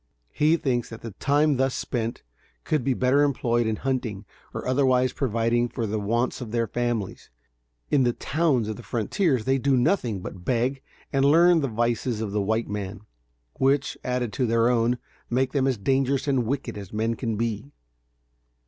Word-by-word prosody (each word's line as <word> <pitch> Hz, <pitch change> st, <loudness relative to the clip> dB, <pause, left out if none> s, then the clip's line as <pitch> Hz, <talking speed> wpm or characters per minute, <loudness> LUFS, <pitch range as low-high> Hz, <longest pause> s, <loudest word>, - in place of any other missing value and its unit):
He 155 Hz, +3 st, +3 dB
thinks 125 Hz, -7 st, -1 dB
that 115 Hz, -, -9 dB
the 115 Hz, -, -7 dB
time 145 Hz, +6 st, +2 dB
thus 135 Hz, 0 st, +1 dB
spent 115 Hz, -1 st, -3 dB, 0.4 s
could 150 Hz, -5 st, 0 dB
be 130 Hz, 0 st, +1 dB
better 130 Hz, +3 st, +3 dB
employed 120 Hz, -5 st, +1 dB
in 110 Hz, -, 0 dB
hunting 115 Hz, -5 st, -3 dB, 0.3 s
or -, -, -5 dB
otherwise 130 Hz, -1 st, +2 dB
providing 120 Hz, -1 st, +1 dB
for 115 Hz, -2 st, -3 dB
the 110 Hz, 0 st, -2 dB
wants 120 Hz, +6 st, -1 dB
of 120 Hz, -, -5 dB
their 115 Hz, +1 st, 0 dB
families. 120 Hz, -2 st, -3 dB, 0.6 s
In 145 Hz, -, +4 dB
the 120 Hz, -1 st, +3 dB
towns 140 Hz, -7 st, 0 dB
of 110 Hz, -, -4 dB
the -, -, -9 dB
frontiers 125 Hz, -, 0 dB
they 135 Hz, +1 st, +2 dB
do 135 Hz, 0 st, +2 dB
nothing 120 Hz, -, +1 dB
but 90 Hz, 0 st, -8 dB
beg 125 Hz, +5 st, 0 dB, 0.3 s
and 135 Hz, -1 st, +2 dB
learn 165 Hz, +4 st, +6 dB
the 140 Hz, -, 0 dB
vices 120 Hz, 0 st, -1 dB
of 110 Hz, -2 st, -3 dB
the 105 Hz, 0 st, 0 dB
white 110 Hz, +3 st, 0 dB
man, 100 Hz, -1 st, -5 dB, 0.6 s
which, 135 Hz, +1 st, +2 dB
added 125 Hz, -3 st, -2 dB
to 125 Hz, -, 0 dB
their 115 Hz, +1 st, +3 dB
own, 120 Hz, 0 st, +2 dB, 0.3 s
make 130 Hz, +2 st, +1 dB
them 135 Hz, -2 st, +1 dB
as 130 Hz, -3 st, +1 dB
dangerous 135 Hz, +5 st, +1 dB
and 130 Hz, -5 st, +1 dB
wicked 125 Hz, -4 st, -3 dB
as 100 Hz, -3 st, -9 dB
men 110 Hz, +2 st, 0 dB
can 115 Hz, -1 st, -3 dB
be. 115 Hz, +2 st, -2 dB
120 Hz, 180 wpm, -25 LUFS, 115-135 Hz, 0.6 s, learn